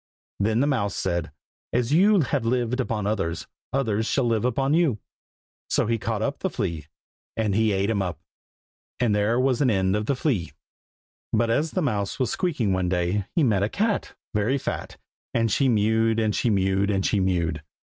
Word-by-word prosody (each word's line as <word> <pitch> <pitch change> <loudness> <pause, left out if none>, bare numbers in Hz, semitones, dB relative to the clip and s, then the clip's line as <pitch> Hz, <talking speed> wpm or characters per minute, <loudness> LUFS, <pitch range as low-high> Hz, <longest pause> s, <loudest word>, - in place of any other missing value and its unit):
Then 110 +4 +2
the - - +3
mouse 115 -9 0
said, 85 -4 -2 0.4
"as 125 +3 0
you 195 +3 +5
have 140 -2 -1
lived 120 +1 0
upon 115 -5 -1
others, 100 -6 -2 0.3
others 110 -5 0
shall 135 - +1
live 115 -2 +1
upon 135 +3 +1
you!" 160 -9 +3 0.7
So - - +2
he 115 +1 0
caught 110 0 -2
up 140 +3 -2
the 190 - -1
flea, 85 - -3 0.5
and 110 -3 +1
he 110 +1 +2
ate 100 +2 +1
him 100 -3 0
up. 90 -3 -3 0.8
And 120 -4 +2
there 105 +4 +2
was 130 +1 +2
an 135 - +4
end 95 -2 +2
of 105 +1 -2
the 140 - +1
flea. 125 - -1 0.8
But 115 +1 +2
as 150 +7 +1
the 185 +3 -1
mouse 100 -8 -1
was 125 -3 0
squeaking 135 - 0
one 95 -1 0
day, 90 +2 0
He 165 - +3
met 105 -7 +2
a 100 - +1
cat, 210 - -1 0.2
Very 110 +6 +1
fat, - - -5 0.4
And 115 -2 +2
she 135 +4 +2
mewed, 110 0 +2
And 110 -2 +1
she 120 - +1
mewed, 95 -1 +1
And 95 -2 0
she 105 - +2
mewed. 85 -4 0
110 Hz, 190 wpm, -25 LUFS, 100-130 Hz, 0.8 s, you